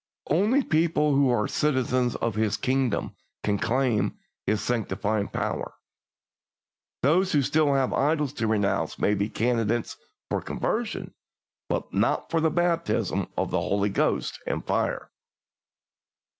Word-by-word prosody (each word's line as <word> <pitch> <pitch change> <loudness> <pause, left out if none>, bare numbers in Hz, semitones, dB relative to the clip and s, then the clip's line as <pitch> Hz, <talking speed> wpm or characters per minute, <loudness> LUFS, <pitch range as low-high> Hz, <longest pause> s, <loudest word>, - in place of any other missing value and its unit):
"Only 210 - +3
people 155 -4 +2
who 140 -1 +4
are 120 -4 +2
citizens 130 -4 +1
of 115 - -1
His 110 0 0
kingdom 130 -4 0 0.3
can 100 -1 0
claim 120 -2 +1 0.3
His 110 - +2
sanctifying 105 -3 -1
power. - - -3 1.3
Those 180 +7 +3
who 145 -2 +4
still 150 +1 +2
have 135 -2 +1
idols 150 -1 +1
to 115 -5 -1
renounce 105 -2 0
may 105 - +2
be 100 +1 0
candidates 115 0 0 0.3
for - - -1
conversion, 225 -1 -3 0.6
but - - -2
not - - +1
for 165 - +2
the 160 - +3
baptism 170 0 0
with - - -1
the - - +1
Holy 100 +1 +1
Ghost 100 - 0
and - - -2
fire. - - -1
130 Hz, 130 wpm, -26 LUFS, 110-155 Hz, 1.3 s, who